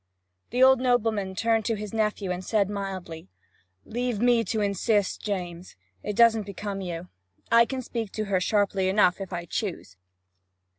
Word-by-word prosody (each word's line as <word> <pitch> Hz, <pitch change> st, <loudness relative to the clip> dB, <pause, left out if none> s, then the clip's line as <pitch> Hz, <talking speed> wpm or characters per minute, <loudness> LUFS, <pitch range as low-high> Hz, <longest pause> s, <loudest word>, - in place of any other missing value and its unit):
The 250 Hz, +2 st, +2 dB
old 265 Hz, -1 st, +7 dB
nobleman 225 Hz, -6 st, +1 dB
turned 225 Hz, +1 st, +1 dB
to 225 Hz, -, +1 dB
his 210 Hz, 0 st, -7 dB
nephew 210 Hz, -3 st, -1 dB
and 180 Hz, +1 st, -4 dB
said 205 Hz, -1 st, +1 dB
mildly: 185 Hz, -, -6 dB, 0.6 s
'Leave 240 Hz, -1 st, -2 dB
me 240 Hz, 0 st, +4 dB
to 220 Hz, +3 st, -1 dB
insist, 205 Hz, 0 st, 0 dB
James. 180 Hz, -3 st, -5 dB, 0.3 s
It 210 Hz, -, -4 dB
doesn't 225 Hz, -2 st, +4 dB
become 200 Hz, 0 st, -5 dB
you. 175 Hz, -1 st, -6 dB, 0.4 s
I 230 Hz, 0 st, +7 dB
can 260 Hz, -1 st, -4 dB
speak 225 Hz, -4 st, -4 dB
to 215 Hz, -, -2 dB
her 195 Hz, -2 st, +1 dB
sharply 200 Hz, -2 st, +1 dB
enough, 190 Hz, -1 st, +3 dB
if 195 Hz, -, -6 dB
I 175 Hz, -1 st, -4 dB
choose.' 170 Hz, -, -4 dB
205 Hz, 160 wpm, -26 LUFS, 190-225 Hz, 0.6 s, old